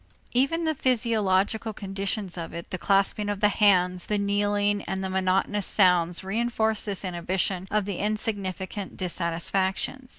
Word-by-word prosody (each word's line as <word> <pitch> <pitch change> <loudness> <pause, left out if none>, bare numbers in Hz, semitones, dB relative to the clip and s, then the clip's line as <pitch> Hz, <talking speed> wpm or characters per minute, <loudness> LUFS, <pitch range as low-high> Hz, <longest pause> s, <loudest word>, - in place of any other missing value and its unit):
Even 275 +7 +1
the 315 -1 +1
physiological 220 -4 +1
conditions 195 -1 -3
of 170 -2 -6
it, 170 - -8
the 185 - -3
clasping 200 +2 +1
of 205 -1 -2
the 210 0 +4
hands, 185 -4 +3
the 210 - 0
kneeling, 205 0 +1
and 190 - -3
monotonous 190 +1 0
sounds 180 -3 +3
reënforce 220 +1 0
this 200 -2 -3
inhibition 185 +1 -1
of 210 -2 +1
the 200 -3 -3
insignificant 200 -2 -3
dissatisfactions. 185 +7 -1
200 Hz, 135 wpm, -26 LUFS, 185-215 Hz, -, the